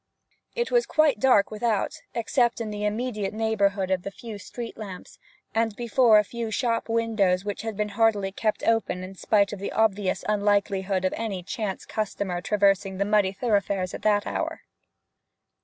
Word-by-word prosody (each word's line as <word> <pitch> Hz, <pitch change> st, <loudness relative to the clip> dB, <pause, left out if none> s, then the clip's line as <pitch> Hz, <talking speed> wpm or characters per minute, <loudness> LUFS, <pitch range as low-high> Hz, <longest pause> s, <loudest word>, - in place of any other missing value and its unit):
It 475 Hz, 0 st, -1 dB
was 485 Hz, -1 st, +3 dB
quite 305 Hz, -7 st, +3 dB
dark 220 Hz, -5 st, +4 dB
without, 215 Hz, -1 st, -1 dB
except 240 Hz, +1 st, +1 dB
in 220 Hz, -2 st, -3 dB
the 210 Hz, 0 st, -3 dB
immediate 215 Hz, -2 st, -2 dB
neighbourhood 200 Hz, -3 st, +1 dB
of 185 Hz, -1 st, +1 dB
the 195 Hz, -, -5 dB
feeble 215 Hz, +1 st, -9 dB
street 235 Hz, +3 st, -7 dB
lamps, 195 Hz, -4 st, -9 dB, 0.3 s
and 225 Hz, -1 st, 0 dB
before 235 Hz, -1 st, +4 dB
a 210 Hz, -, +5 dB
few 230 Hz, +2 st, -5 dB
shop 230 Hz, 0 st, -1 dB
windows 215 Hz, -5 st, +1 dB
which 205 Hz, -1 st, -3 dB
had 220 Hz, -2 st, -5 dB
been 210 Hz, 0 st, -1 dB
hardily 205 Hz, -2 st, +2 dB
kept 215 Hz, +2 st, -1 dB
open 225 Hz, -5 st, +1 dB
in 185 Hz, +1 st, -8 dB
spite 200 Hz, +1 st, +2 dB
of 205 Hz, -, -6 dB
the 200 Hz, -, -4 dB
obvious 205 Hz, -3 st, +1 dB
unlikelihood 200 Hz, -2 st, +1 dB
of 185 Hz, -, +1 dB
any 200 Hz, -5 st, -4 dB
chance 200 Hz, +1 st, -4 dB
customer 200 Hz, -4 st, -3 dB
traversing 195 Hz, -1 st, +2 dB
the 200 Hz, -, +1 dB
muddy 205 Hz, -2 st, +3 dB
thoroughfares 200 Hz, -3 st, 0 dB
at -, -, -6 dB
that 205 Hz, -1 st, +2 dB
hour. -, -, -3 dB
210 Hz, 170 wpm, -26 LUFS, 195-225 Hz, 0.3 s, a